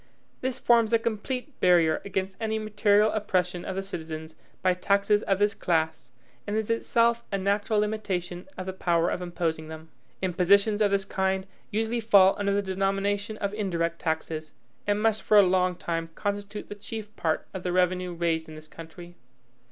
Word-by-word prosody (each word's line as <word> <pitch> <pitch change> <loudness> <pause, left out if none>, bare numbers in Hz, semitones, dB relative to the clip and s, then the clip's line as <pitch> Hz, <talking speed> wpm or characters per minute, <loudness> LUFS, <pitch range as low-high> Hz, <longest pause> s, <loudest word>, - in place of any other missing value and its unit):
This 260 0 -2
forms 235 -3 +3
a - - +7
complete 250 +5 -4
barrier 170 -3 +4
against 190 -1 -3
any 220 0 0
material 210 0 +3
oppression 180 -4 -1
of 190 - -4
the 195 - -2
citizens 160 -4 -7 0.3
by 185 -1 +4
taxes 200 +3 +2
of 195 -3 +1
this 205 +1 +2
class, 160 -8 -1 0.4
and 205 - -2
is 220 0 -1
itself 230 0 +2
a 195 - 0
natural 205 +2 +1
limitation 190 -4 -3
of 185 - -5
the 190 - -4
power 170 -2 +1
of - - -3
imposing 165 -3 -2
them. 160 0 -10 0.3
Impositions 200 +4 +3
of 205 - +4
this 195 -1 0
kind 190 -1 -1 0.2
usually 225 +3 -1
fall 200 -4 +6
under 200 -1 +1
the 200 0 +1
denomination 195 +2 -1
of 200 -1 -2
indirect 170 -5 -1
taxes, 160 -1 -3 0.3
and 205 0 +2
must 220 -1 +2
for 215 - +4
a 205 - +9
long 185 -1 +2
time 165 -1 -3
constitute 205 0 -4
the - - -6
chief 210 +1 -8
part 160 -1 -1
of 190 - -5
the 180 - -2
revenue 180 0 +1
raised 165 -2 -1
in 155 - -9
this 155 0 -11
country. 165 +2 -11
195 Hz, 175 wpm, -27 LUFS, 175-210 Hz, 0.4 s, a